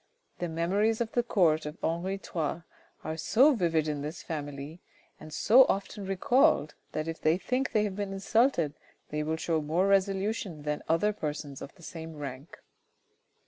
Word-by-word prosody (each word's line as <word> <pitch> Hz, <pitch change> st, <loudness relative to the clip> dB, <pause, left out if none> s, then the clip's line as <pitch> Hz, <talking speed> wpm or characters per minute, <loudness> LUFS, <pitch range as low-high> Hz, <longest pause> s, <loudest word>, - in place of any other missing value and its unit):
"The 175 Hz, -, -2 dB
memories 195 Hz, +7 st, +1 dB
of 230 Hz, -2 st, -1 dB
the 240 Hz, -, +2 dB
court 165 Hz, -10 st, +2 dB
of 150 Hz, +3 st, -7 dB
Henri 170 Hz, +4 st, -1 dB
III. 165 Hz, -3 st, -3 dB, 0.4 s
are 160 Hz, 0 st, -4 dB
so 260 Hz, -, +5 dB
vivid 165 Hz, -, +1 dB
in 150 Hz, -2 st, -2 dB
this 155 Hz, +3 st, -6 dB
family, 145 Hz, +1 st, -6 dB, 0.4 s
and 155 Hz, 0 st, -11 dB
so 240 Hz, -, +6 dB
often 195 Hz, 0 st, -2 dB
recalled, 220 Hz, -, +3 dB, 0.2 s
that 155 Hz, +1 st, -2 dB
if 165 Hz, 0 st, -5 dB
they 155 Hz, +2 st, +3 dB
think 255 Hz, +7 st, -1 dB
they 215 Hz, -, +3 dB
have 200 Hz, -3 st, -2 dB
been 200 Hz, -1 st, -3 dB
insulted 195 Hz, -, +2 dB, 0.4 s
they 150 Hz, 0 st, -2 dB
will 160 Hz, +1 st, -1 dB
show 160 Hz, -1 st, 0 dB
more 160 Hz, +5 st, +1 dB
resolution 195 Hz, -3 st, 0 dB
than 150 Hz, 0 st, -2 dB
other 185 Hz, +6 st, +3 dB
persons 150 Hz, -5 st, -5 dB
of 140 Hz, -, -9 dB
the 175 Hz, -, -17 dB
same 160 Hz, -1 st, -8 dB
rank." 140 Hz, 0 st, -7 dB
170 Hz, 170 wpm, -29 LUFS, 155-200 Hz, 0.4 s, so